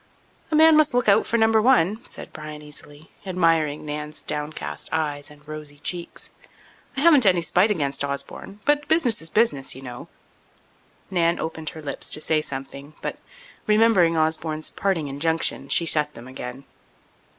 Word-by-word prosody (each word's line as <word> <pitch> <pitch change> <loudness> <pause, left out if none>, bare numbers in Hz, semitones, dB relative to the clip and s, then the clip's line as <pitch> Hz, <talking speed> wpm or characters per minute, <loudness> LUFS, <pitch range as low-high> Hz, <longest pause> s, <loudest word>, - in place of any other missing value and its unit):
"A 315 - 0
man 320 +1 +7
must 305 -4 +4
look 245 - +1
out 205 +1 +4
for 235 - +1
Number 220 -1 +4
One," 220 -3 +3
said - - -5
Bryan 150 -1 -8
easily, 150 +1 -10
admiring 165 -6 +1
Nan's 150 +1 -6
downcast 150 +1 -5
eyes 150 -2 -2
and 150 0 -18
rosy 150 -1 -9
cheeks. 170 +3 -4 0.7
"I - - 0
haven't 300 -5 +6
any 180 -3 +3
spite 180 +5 +3
against 140 -8 -1
Osborne, 140 +8 -5
but 295 0 +2
business 255 - +3
is 160 - -3
business, 155 - +2
you 130 - -11
know." 125 -2 -9 1.0
Nan 170 -2 +2
opened 160 -1 -4
her 155 - -11
lips 140 -2 -3
to - - +4
say 155 0 +2
something 140 +1 -7
but, - - -4 0.5
remembering 210 -6 +4
Osborne's 155 0 0
parting 185 -7 -1
injunction, 145 0 -1
she 170 - +3
shut 150 -2 +2
them 120 +2 -11
again. 130 0 -8
160 Hz, 160 wpm, -23 LUFS, 150-205 Hz, 1.0 s, man